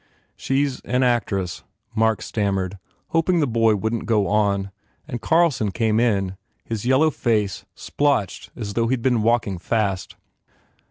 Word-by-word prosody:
"She 135 +2 +1
s 135 -3 -5
an 125 +1 +1
actress," 100 -7 0 0.3
Mark 110 -2 +1
stammered, 100 -3 -2 0.3
hoping 165 +2 +2
the 150 - +3
boy 115 -3 +3
wouldn 110 +3 -1
t - - -9
go 105 -3 +2
on, 100 -1 +1 0.4
and 120 -6 -5
Carlson 150 -7 +2
came 110 +2 +1
in, 100 -5 +1 0.3
his 115 +1 -4
yellow 140 +5 +4
face 105 -8 -1
splotched 140 -10 -1
as 100 -2 -5
though 115 +1 +1
he 130 - +2
d 120 - -7
been 125 -4 +2
walking 110 -5 +1
fast. 95 -1 -1
110 Hz, 155 wpm, -22 LUFS, 100-125 Hz, 0.4 s, yellow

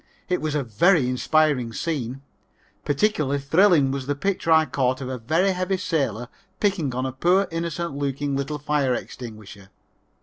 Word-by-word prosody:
It 180 - 0
was 155 -1 -2
a 145 - 0
very 130 - +3
inspiring 130 -1 +1
scene. 135 -3 -3 0.6
Particularly 145 -3 +1
thrilling 150 0 +4
was 135 -1 -4
the 145 - 0
picture 185 +1 -1
I 160 0 +6
caught 130 -3 0
of 130 -2 -5
a 130 -1 -4
very 165 +12 +1
heavy 185 +1 -1
sailor 130 - -1 0.3
picking 175 -11 0
on 130 +1 -1
a 130 - -2
poor 180 +8 +2
innocent 170 -1 -3
looking 140 0 -2
little 140 +2 -2
fire 145 -3 0
extinguisher. 110 -6 -9
145 Hz, 160 wpm, -24 LUFS, 130-170 Hz, 0.6 s, I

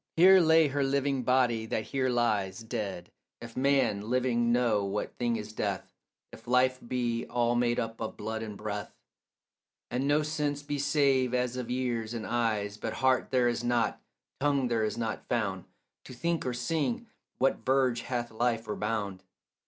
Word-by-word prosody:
Here 185 +3 +8
lay 160 -2 +5
her 140 +1 0
living 135 0 +1
body 120 -3 +2
that 110 - -1
here 130 +2 -1
lies 110 -4 0
Dead, 110 -6 -5 0.3
if 115 -1 -10
man 130 -6 +1
living 120 -2 +2
know 120 -4 +2
what 100 +1 -3
thing 120 -1 +1
is 105 -1 -6
death, 100 -3 -3 0.4
If - - -14
life 130 +1 +3
be 120 -2 -1
all 120 0 +1
made 120 0 +1
up 115 -1 -4
of 110 - -4
blood 110 +1 -4
and 105 -2 -6
breath, 105 0 -5 1.0
And 130 +3 0
no 150 +1 +3
sense 150 -1 -2
be 145 0 -3
save 135 -3 +2
as 125 0 0
of 125 -2 -4
ears 120 -3 -2
and 115 - -4
eyes. 110 -4 -1
But 110 +1 -4
heart 130 0 +2
there 125 -2 +3
is 120 0 -1
not, 120 -1 0 0.4
tongue 140 -2 +1
there 115 -2 +1
is 110 +1 -1
not 115 -2 -3
found, 100 -6 -1 0.4
To - - -9
think 170 +2 -1
or 125 - -1
sing 165 - -1 0.3
what 135 +2 +1
verge 130 -2 +2
hath 120 -2 -3
life 115 0 0
or 105 - -2
bound. 105 -3 -2
120 Hz, 175 wpm, -29 LUFS, 110-130 Hz, 1.0 s, Here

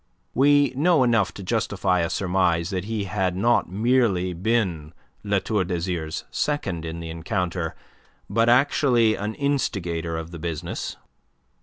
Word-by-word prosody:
We 145 +1 +4
know 155 0 +4
enough 115 -5 +2
to 100 - -7
justify 95 -3 0
a 85 -1 0
surmise 90 -2 +1
that 95 -1 -2
he 110 -1 -2
had 95 -2 -1
not 115 +2 +2
merely 100 -3 +1
been 90 -5 -1 0.3
La 100 -1 +1
Tour 105 0 0
d'Azyr's 85 -3 -3
second 100 - -2
in 85 +1 -5
the 80 -1 -6
encounter, 85 0 -2 0.5
but 115 +1 +2
actually 125 -3 +4
an 105 +1 -4
instigator 90 - -1
of 80 +1 -6
the 85 - -8
business. 85 +1 -4
95 Hz, 140 wpm, -24 LUFS, 85-115 Hz, 0.5 s, We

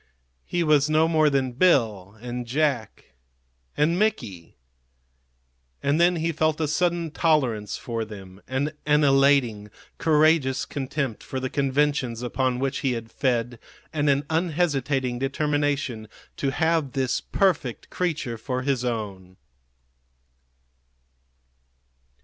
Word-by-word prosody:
He 175 - 0
was 150 -2 +3
no 155 +1 +4
more 155 -2 +3
than 135 -2 0
Bill 115 - +2
and 120 0 -5
Jack 135 -4 -1 0.7
and 165 +4 +2
Mickey. 115 - -2 1.3
And 145 +4 +2
then 175 +1 +4
he 165 0 -1
felt 155 -1 0
a 155 - 0
sudden 170 +1 0
tolerance 130 -11 +1
for 115 -2 -4
them, 100 -3 -11
and 140 +4 -1
an 150 0 +4
elating, 135 -7 +3 0.3
courageous 155 -4 +3
contempt 135 -4 -3
for 130 - -5
the 130 0 -4
conventions 140 -3 0
upon 130 0 0
which 135 +1 -1
he 135 -3 0
had 115 -1 -6
fed, 120 -2 -1 0.3
and 150 -2 +1
an 140 0 +2
unhesitating 145 -6 0
determination 140 -4 -1 0.3
to 140 - 0
have 160 -1 0
this 130 -2 0
perfect 165 - 0
creature 150 -10 -2
for 130 +2 -3
his 135 -2 0
own. 100 -6 -4
135 Hz, 120 wpm, -25 LUFS, 120-155 Hz, 1.3 s, no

